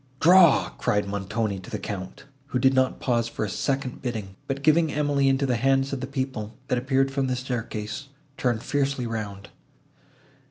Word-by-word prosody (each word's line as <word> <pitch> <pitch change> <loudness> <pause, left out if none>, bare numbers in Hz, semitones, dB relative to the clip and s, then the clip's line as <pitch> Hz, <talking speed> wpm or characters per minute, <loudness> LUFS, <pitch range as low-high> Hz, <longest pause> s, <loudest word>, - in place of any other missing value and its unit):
"Draw!" 175 -2 +6
cried 105 -1 +1
Montoni 100 +1 -2
to 95 - -11
the - - -3
Count, 95 -3 -6 0.2
who 130 - -1
did 130 +2 +4
not 130 -1 +2
pause 120 -2 +1
for 115 - -3
a - - -4
second 135 0 -2
bidding, 110 -7 -4
but, 140 0 -3
giving 155 +1 +4
Emily 145 -2 +2
into 135 +1 +2
the 125 -3 +1
hands 135 +2 +2
of 135 - -2
the 130 - -3
people, 130 -5 -4
that 125 - +2
appeared 135 +1 +1
from 135 -1 0
the 130 - 0
staircase, 125 0 -4 0.3
turned 120 -4 0
fiercely 140 -3 0
round. 105 -4 -5
130 Hz, 175 wpm, -25 LUFS, 110-135 Hz, 0.3 s, Draw